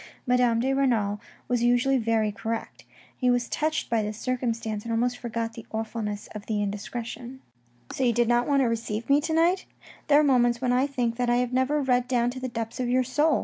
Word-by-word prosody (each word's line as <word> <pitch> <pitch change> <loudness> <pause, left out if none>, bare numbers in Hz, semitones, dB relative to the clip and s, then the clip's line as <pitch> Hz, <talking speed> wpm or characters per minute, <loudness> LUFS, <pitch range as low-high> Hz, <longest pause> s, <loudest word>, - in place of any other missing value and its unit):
Madame 250 -2 +3
de 265 +3 +1
Renal 220 -7 +1 0.3
was 245 -1 0
usually 245 +3 +3
very 225 -2 +1
correct. 225 +2 -5 0.3
He 250 - +1
was 245 -1 +2
touched 310 +1 -1
by 230 -2 +1
this 210 0 -4
circumstance, 230 -4 -2
and 230 - -5
somewhat 240 +2 +1
forgot 230 -1 -4
the 230 - -10
awfulness 220 -2 -4
of 210 -1 -8
the 215 -2 -1
indiscretion. 235 +5 -5 0.3
" 120 0 -18
So 265 - -2
you 245 - +4
did 235 0 +2
not 240 +1 +2
want 280 -1 +3
to - - +2
receive 230 -1 -2
me 285 +1 +5
to 320 - -3
night? 345 +3 +2 0.4
There 290 -1 +6
are - - +4
moments 245 -4 +3
when 250 -1 +1
I 255 +3 +2
think 245 -4 -1
that 245 -1 0
I 240 - +3
have 250 0 0
never 270 +3 +1
read 250 -1 +2
down 245 -1 +1
to 255 - -7
the 255 0 -4
depths 230 -1 -5
of 250 -1 -1
your 255 +1 +3
soul. 295 +4 +2
240 Hz, 225 wpm, -26 LUFS, 225-255 Hz, 0.4 s, There